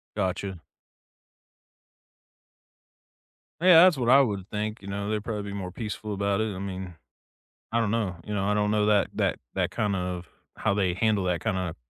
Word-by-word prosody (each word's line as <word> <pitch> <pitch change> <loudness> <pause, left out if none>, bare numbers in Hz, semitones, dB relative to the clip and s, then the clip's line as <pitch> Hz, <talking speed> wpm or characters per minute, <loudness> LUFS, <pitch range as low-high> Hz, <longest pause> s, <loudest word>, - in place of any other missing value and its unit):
Gotcha. 95 -2 -2 3.0
Yeah, 175 -1 +8
that's 185 -5 +5
what 120 -2 0
I 135 +2 +8
would 100 -7 -1
think, 105 +1 -3
you 100 - -11
know, 100 +1 -3
they're 105 -1 -1
probably 105 -2 -4
be 100 - -5
more 90 -2 -5
peaceful 105 0 -5
about 100 +1 0
it, 110 -3 -2
I - - -6
mean, 95 -2 -6 0.8
I 115 - +2
don't 110 -3 +1
know, 105 -6 -1
you 105 - -4
know, 95 -1 0
I 105 - +2
don't 105 0 +1
know 105 -1 +2
that 105 -2 +3
that - - 0 0.2
that - - 0
kind 105 -2 0
of 90 -2 -4 0.3
how - - 0
they 95 -3 +1
handle 105 0 +1
that 90 -2 0
kind 110 -4 -1
of 90 -3 -3
100 Hz, 185 wpm, -27 LUFS, 95-110 Hz, 3.0 s, Yeah